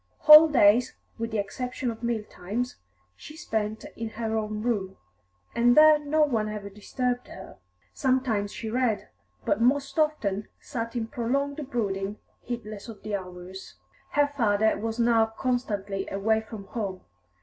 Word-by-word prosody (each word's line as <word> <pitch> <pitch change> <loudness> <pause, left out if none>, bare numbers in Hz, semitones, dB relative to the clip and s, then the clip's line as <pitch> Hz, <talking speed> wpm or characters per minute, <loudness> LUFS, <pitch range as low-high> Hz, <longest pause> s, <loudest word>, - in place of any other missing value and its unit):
Whole 305 +1 +10
days, 245 -4 +4 0.2
with 230 0 -2
the 220 - -2
exception 250 +4 -3
of 225 - -10
meal 235 -2 -1
times, 215 +6 -4 0.4
she 300 - -12
spent 220 -9 -3
in 230 -1 -4
her 225 0 -3
own 215 -1 -2
room, 200 -6 -2 0.6
and 245 +2 +3
there 310 0 +8
no 300 +1 +2
one 225 -7 0
ever 205 -1 -6
disturbed 245 +4 -3
her. - - -11 0.3
Sometimes 255 -6 0
she 225 -3 -6
read, 240 -3 0 0.4
but 210 - +1
most 275 +5 +1
often 215 -10 0
sat 230 0 -5
in 235 -2 -1
prolonged 275 +5 -2
brooding, 200 -4 -2 0.2
heedless 215 -4 -6
of 220 - -11
the 210 -1 -2
hours. 180 0 -8 0.4
Her 290 0 +2
father 220 -4 +2
was 225 +1 -4
now 230 -1 +4
constantly 205 -6 -2
away 220 +3 +1
from 220 -2 -9
home. 195 -4 -4
225 Hz, 150 wpm, -27 LUFS, 205-250 Hz, 0.6 s, Whole